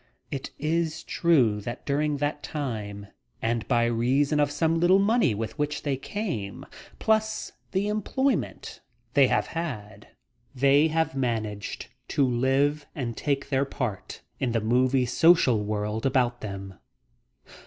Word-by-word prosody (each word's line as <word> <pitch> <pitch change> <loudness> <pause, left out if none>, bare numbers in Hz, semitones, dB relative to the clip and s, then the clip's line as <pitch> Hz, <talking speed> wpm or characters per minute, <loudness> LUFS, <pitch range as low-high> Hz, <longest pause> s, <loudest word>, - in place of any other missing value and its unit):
It 135 -2 -4
is 160 +1 -1
true 125 -12 +2
that 120 +3 -6
during 145 +1 0
that 145 +1 -2
time, 105 -9 -4 0.3
and 115 0 -1
by 120 -2 +3
reason 130 +6 +2
of 145 -1 +3
some 160 +3 +1
little 175 +3 +5
money 200 - +3
with 110 +7 -5
which 150 0 -1
they 140 -2 0
came, 135 - -4 0.3
plus 220 0 0 0.2
the 195 +2 0
employment 240 +6 -1 0.3
they - - +6
have - - +1
had, 125 -12 -6 0.5
they 140 +4 +5
have 160 -1 0
managed 110 -6 -2 0.2
to 140 - +2
live 135 +4 +1
and 120 -4 -3
take 140 +1 -1
their 135 -1 +2
part 125 -7 -4 0.2
in 125 -3 0
the 115 - +2
movie 125 +4 +2
social 125 -5 +4
world 105 +3 -1
about 125 -2 +1
them. 100 -2 -7
135 Hz, 135 wpm, -26 LUFS, 115-155 Hz, 0.5 s, they